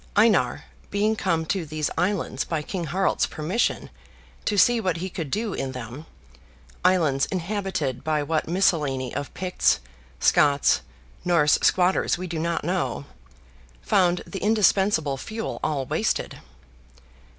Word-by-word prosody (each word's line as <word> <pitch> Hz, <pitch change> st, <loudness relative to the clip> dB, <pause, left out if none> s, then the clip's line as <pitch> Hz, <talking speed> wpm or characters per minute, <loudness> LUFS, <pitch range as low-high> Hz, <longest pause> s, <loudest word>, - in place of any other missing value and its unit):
Einar, 210 Hz, -1 st, +3 dB, 0.3 s
being 210 Hz, +2 st, +1 dB
come 165 Hz, -6 st, 0 dB
to 185 Hz, +2 st, -1 dB
these 155 Hz, -1 st, -3 dB
islands 190 Hz, 0 st, -1 dB
by 160 Hz, -2 st, -3 dB
King 175 Hz, +1 st, -4 dB
Harald's 190 Hz, +5 st, +1 dB
permission, 170 Hz, +10 st, -1 dB, 0.5 s
to 205 Hz, -, 0 dB
see 240 Hz, +3 st, +5 dB
what 185 Hz, -5 st, 0 dB
he 185 Hz, +2 st, -5 dB
could 165 Hz, -5 st, -5 dB
do 210 Hz, -, -2 dB
in 130 Hz, -1 st, -3 dB
them, 125 Hz, +5 st, -8 dB, 0.8 s
islands 165 Hz, -7 st, +3 dB
inhabited 185 Hz, -, -2 dB
by 155 Hz, 0 st, 0 dB
what 155 Hz, +1 st, -1 dB
miscellany 150 Hz, -8 st, +1 dB
of 140 Hz, 0 st, -4 dB
Picts, 185 Hz, -1 st, +1 dB, 0.4 s
Scots, 145 Hz, -1 st, +4 dB, 0.4 s
Norse 170 Hz, -4 st, +3 dB
squatters 180 Hz, 0 st, +2 dB
we 185 Hz, -, -5 dB
do 165 Hz, -2 st, -4 dB
not 170 Hz, +1 st, -1 dB
know, 170 Hz, -, -2 dB, 0.8 s
found 180 Hz, -2 st, +2 dB
the 195 Hz, -, -6 dB
indispensable 195 Hz, -8 st, +2 dB
fuel 220 Hz, +10 st, -5 dB
all 145 Hz, -4 st, -1 dB
wasted. -, -, -1 dB
170 Hz, 130 wpm, -24 LUFS, 150-195 Hz, 0.8 s, see